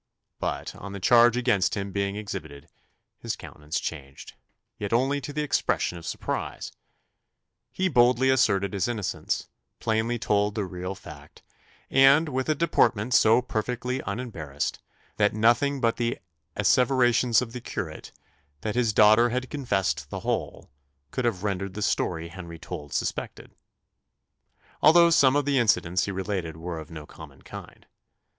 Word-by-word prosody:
But, - - -3
on 100 0 -9
the 100 - -6
charge 120 +4 +5
against 120 -7 +1
him 100 0 -4
being 100 0 -2
exhibited, 80 -9 -7 0.5
his - - -3
countenance 75 +2 -6
changed 70 -4 -7 0.5
yet 100 -1 -4
only 135 +5 +1
to 145 - -6
the 150 +1 -2
expression 140 -10 0
of 85 -1 -9
surprise! - - -4 1.0
He 190 - 0
boldly 125 -3 +4
asserted 100 -6 +2
his 100 0 0
innocence, 110 -5 -3 0.3
plainly 115 +1 0
told 105 -2 0
the 105 -3 -1
real 90 +1 -5
fact, - - -13 0.5
and 135 +4 +6
with 130 +1 -2
a 155 - +3
deportment 120 -7 +1
so 115 +2 +5
perfectly 125 +2 -3
unembarrassed, 95 - -4 0.4
that 105 0 +2
nothing 120 +6 +3
but 115 -2 +1
the 120 0 -1 0.4
asseverations 120 +2 +3
of 115 -2 -5
the 125 - -6
curate, 90 -9 -6 0.5
"that 105 - -2
his 120 -3 +1
daughter 110 +3 +6
had 125 +2 -3
confessed 120 -10 -1
the - - -5
whole," - - -3 0.4
could 130 - -2
have 105 -5 -1
rendered 95 -2 -3
the 105 - -3
story 85 -3 -1
Henry 85 -1 -9
told 75 -2 -8
suspected; - - -4 1.3
although 170 +2 +7
some 140 -4 +5
of 145 -1 +1
the 140 -2 +2
incidents 90 -6 +2
he 100 - -3
related 95 -4 -3
were 85 0 -5
of 80 - -10
no 80 -3 -9
common - - -14
kind. - - -11
110 Hz, 150 wpm, -26 LUFS, 95-125 Hz, 1.3 s, although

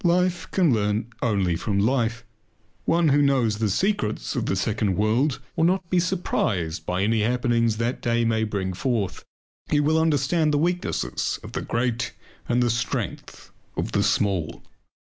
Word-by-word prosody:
Life 180 0 +1
can 175 -8 +3
learn 105 +2 0
only 100 -7 +1
from 100 +4 -2
life. 115 +2 +1 0.6
One 170 -1 +3
who 145 +1 +4
knows 125 -7 +2
the 110 -2 +1
secrets 115 - -1
of - - -1
the - - +1
second 100 0 0
world 120 +7 +1 0.2
will 160 - +1
not 185 +1 +2
be 180 - +4
surprised 110 - -1
by 90 +1 0
any 110 +1 +2
happenings 115 -1 +1
that 115 +2 -2
the - - -2
day 115 0 +2
may 110 -1 +1
bring 100 -3 -2
forth. 100 -2 -2 0.5
He 150 - +3
will 155 +2 +3
understand 155 +1 +2
the 145 - +2
weaknesses 175 +4 -1
of - - -9
the - - -3
great 120 +1 -1 0.4
and 120 0 +3
the 120 - +2
strength 120 +1 -4 0.3
of - - -2
the - - +1
small. 95 -6 0
120 Hz, 165 wpm, -24 LUFS, 105-150 Hz, 0.6 s, who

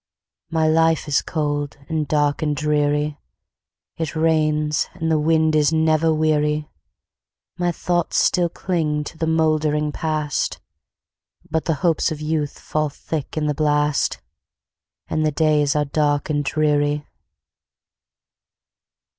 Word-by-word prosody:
My 160 -1 +1
life 160 0 +2
is 145 - +2
cold, 145 -2 -2
and 155 -2 -1
dark, 145 0 +1
and 150 -2 0
dreary; 150 0 0 0.8
It 160 -1 -3
rains, 155 -1 +1
and 160 0 -2
the 155 - +3
wind 160 0 +2
is 150 0 +3
never 160 0 +2
weary; 150 -1 +1 0.9
My 175 0 +1
thoughts 175 0 -1
still 175 -1 +3
cling 160 -4 -1
to 150 - -9
the 160 - 0
mouldering 155 -2 +1
Past, 155 -1 -2 0.9
But 160 -1 0
the 165 - +1
hopes 165 -1 +2
of 155 - -4
youth 150 -1 -2
fall 155 -1 -2
thick 150 +1 -5
in 155 - 0
the 150 - +1
blast, 150 0 +1 0.9
And 155 - -1
the 155 - +2
days 150 -1 +2
are 150 0 +2
dark 145 0 0
and 145 -1 0
dreary. 145 0 +1
155 Hz, 130 wpm, -21 LUFS, 150-160 Hz, 0.9 s, the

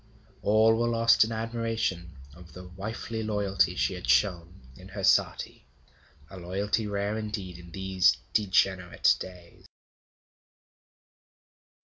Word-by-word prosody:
All 110 +2 +4
were 120 - +1
lost 115 -1 +4
in 110 - -4
admiration 115 - -3 0.2
of 85 +2 -15
the 90 0 -10
wifely 110 +4 -6
loyalty 105 -3 0
she - - 0
had - - -7
shown 85 +7 +1
in - - -13
her - - -7
sati, - - +1 0.6
a 95 - -12
loyalty 100 +5 -2
rare 100 +1 -2
indeed 100 -5 -6
in 85 0 -13
these 95 0 +2 0.2
degenerate 95 -4 +2
days. 90 -2 -11
100 Hz, 115 wpm, -27 LUFS, 90-110 Hz, 0.6 s, All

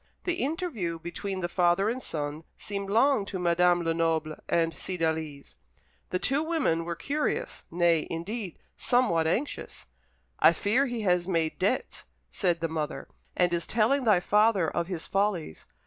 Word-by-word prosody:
The 355 -1 -1
interview 265 - -2
between 185 +3 -5
the 175 - 0
father 175 +2 +2
and 245 +4 -1
son 150 -3 -4
seemed 200 -1 -5
long 230 +2 +3
to 190 - -4
Madame 175 0 +3
Lenoble 165 -1 0
and 165 -1 +2
Cydalise. 160 -5 -3 0.5
The 185 - 0
two 270 +9 +1
women 310 - 0
were 170 0 -3
curious 300 - -2
nay, 170 -2 +2
indeed, 185 +3 -5 0.2
somewhat 210 -11 +2
anxious. 255 - -3 0.5
"I - - +7
fear 250 +7 +1
he 240 -2 -3
has 180 -3 +1
made 165 -4 0
debts," 200 +8 -1 0.3
said 175 -4 0
the 165 - +1
mother, 155 -2 -4 0.3
"and 175 -1 +3
is 170 -1 -1
telling 235 +5 +2
thy 210 -6 +4
father 210 -2 +3
of 170 +1 -2
his 180 -4 -4
follies. 195 - -1
180 Hz, 150 wpm, -28 LUFS, 165-220 Hz, 0.5 s, I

